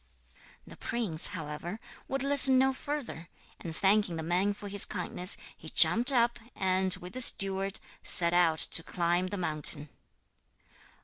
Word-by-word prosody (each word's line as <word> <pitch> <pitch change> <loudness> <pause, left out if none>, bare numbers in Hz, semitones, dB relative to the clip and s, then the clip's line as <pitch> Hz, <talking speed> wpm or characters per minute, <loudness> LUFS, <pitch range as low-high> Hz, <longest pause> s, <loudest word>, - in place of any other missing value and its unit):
The - - -15
prince, 210 -10 +2
however, 170 +3 -8 0.3
would 270 0 -5
listen 275 -2 +5
no 265 +1 +1
further; 265 - -8 0.3
and 165 -2 -9
thanking 195 -2 0
the 160 - -7
man 185 +5 -2
for 205 - -11
his 200 0 +2
kindness, 180 +1 0 0.2
he - - -12
jumped 240 +5 +5
up 235 -2 0 0.2
and, 185 0 0
with 180 0 -13
the 255 - -2
steward, 195 -4 +2 0.2
set 170 -1 -3
out 170 -3 +1
to 165 - +2
climb 175 +1 -3
the 205 - -7
mountain. 155 -3 -1
190 Hz, 145 wpm, -28 LUFS, 170-230 Hz, 0.3 s, listen